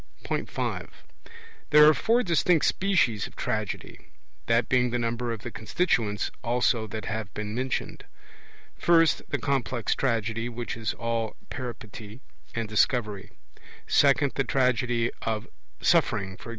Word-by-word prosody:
(5) -, -, -4 dB, 0.7 s
There 150 Hz, 0 st, +8 dB
are 155 Hz, -, +8 dB
four 235 Hz, +9 st, +2 dB
distinct 170 Hz, -1 st, +3 dB
species 175 Hz, -, +2 dB
of -, -, -17 dB
Tragedy -, -, -4 dB, 0.4 s
that 115 Hz, +1 st, +3 dB
being 125 Hz, -1 st, +3 dB
the 120 Hz, -, -1 dB
number 120 Hz, 0 st, -2 dB
of 115 Hz, -2 st, -5 dB
the -, -, -5 dB
constituents 110 Hz, -, 0 dB
also 120 Hz, -1 st, +1 dB
that 110 Hz, 0 st, -6 dB
have 110 Hz, -2 st, -4 dB
been 105 Hz, 0 st, -4 dB
mentioned: 130 Hz, +2 st, -3 dB, 0.7 s
first, 165 Hz, -2 st, +4 dB
the 140 Hz, -, 0 dB
complex 130 Hz, -4 st, -1 dB
Tragedy, 115 Hz, -2 st, -1 dB
which 120 Hz, 0 st, -5 dB
is 115 Hz, 0 st, -3 dB
all 115 Hz, -2 st, -2 dB, 0.2 s
Peripety 115 Hz, -3 st, -7 dB, 0.4 s
and 115 Hz, -1 st, -2 dB
Discovery; 105 Hz, -2 st, 0 dB, 0.6 s
second, 140 Hz, 0 st, +4 dB
the 135 Hz, -, 0 dB
Tragedy 125 Hz, -3 st, +1 dB
of 110 Hz, -2 st, -2 dB, 0.3 s
suffering, 95 Hz, -2 st, +2 dB
e.g. 105 Hz, -, -11 dB
120 Hz, 130 wpm, -27 LUFS, 110-135 Hz, 0.7 s, There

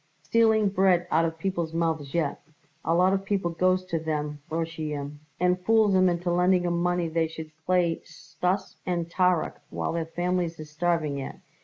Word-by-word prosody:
"Stealing 220 Hz, -2 st, +3 dB
bread 190 Hz, -3 st, +3 dB
out 165 Hz, +1 st, +4 dB
of 160 Hz, 0 st, -3 dB
people's 170 Hz, -2 st, -2 dB
mouths 160 Hz, -4 st, -1 dB
yet. 160 Hz, -4 st, 0 dB, 0.4 s
A 165 Hz, -, +1 dB
lot 185 Hz, +2 st, +4 dB
of 195 Hz, 0 st, 0 dB
people 195 Hz, -3 st, -1 dB
goes 185 Hz, +2 st, +2 dB
to 170 Hz, -3 st, -2 dB
them 150 Hz, -2 st, -3 dB
Roshoyim 155 Hz, -3 st, -4 dB, 0.2 s
and 180 Hz, +1 st, +1 dB
fools 220 Hz, -1 st, +4 dB
'em 185 Hz, -1 st, +5 dB
into 175 Hz, 0 st, -1 dB
lending 180 Hz, +1 st, +3 dB
'em 170 Hz, 0 st, 0 dB
money 175 Hz, -1 st, +1 dB
they 160 Hz, 0 st, 0 dB
should 160 Hz, -1 st, -8 dB, 0.2 s
play 180 Hz, -2 st, +2 dB
Stuss 185 Hz, +2 st, -3 dB
and 170 Hz, -2 st, -2 dB
Tarrok, 180 Hz, -2 st, +1 dB
while -, -, -2 dB
their 165 Hz, -1 st, -2 dB
families 175 Hz, 0 st, -1 dB
is 155 Hz, -1 st, -9 dB
starving 155 Hz, -3 st, 0 dB
yet. 135 Hz, -, -7 dB
170 Hz, 175 wpm, -27 LUFS, 160-185 Hz, 0.4 s, em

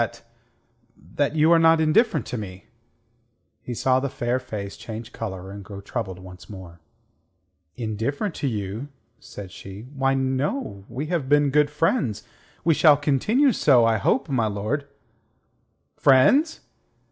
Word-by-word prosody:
that... -, -, -3 dB, 0.7 s
that 140 Hz, -, -2 dB
you 155 Hz, +2 st, +4 dB
are 170 Hz, -, +6 dB
not 165 Hz, 0 st, +5 dB
indifferent 160 Hz, -, +2 dB
to -, -, -5 dB
me." 95 Hz, -4 st, -7 dB, 1.0 s
He 120 Hz, -, -6 dB
saw 130 Hz, +2 st, +2 dB
the 140 Hz, +1 st, -2 dB
fair 120 Hz, 0 st, -1 dB
face 105 Hz, -6 st, -6 dB
change 115 Hz, 0 st, -8 dB
colour 95 Hz, -4 st, -6 dB
and 100 Hz, 0 st, -8 dB
grow 100 Hz, 0 st, -9 dB
troubled 100 Hz, -2 st, -5 dB
once 90 Hz, -1 st, -13 dB
more. 90 Hz, -4 st, -11 dB, 1.0 s
"Indifferent 125 Hz, -, -2 dB
to 140 Hz, -, -1 dB
you?" 105 Hz, +2 st, -4 dB, 0.3 s
said 95 Hz, -3 st, -10 dB
she. 95 Hz, +3 st, -10 dB
"Why, 135 Hz, -1 st, +1 dB
no. 135 Hz, -, -2 dB
We 130 Hz, +6 st, -4 dB
have 145 Hz, -6 st, -1 dB
been 145 Hz, -1 st, +4 dB
good 150 Hz, +1 st, +3 dB
friends; 150 Hz, -, 0 dB, 0.4 s
we 165 Hz, +1 st, +4 dB
shall 150 Hz, -1 st, +6 dB
continue 210 Hz, -, +2 dB
so, 130 Hz, -, +4 dB
I 115 Hz, -1 st, +3 dB
hope, 215 Hz, -, +1 dB
my 125 Hz, -6 st, +1 dB
lord." 110 Hz, +8 st, -3 dB, 1.1 s
"Friends! 270 Hz, -, +4 dB
130 Hz, 145 wpm, -24 LUFS, 105-150 Hz, 1.1 s, are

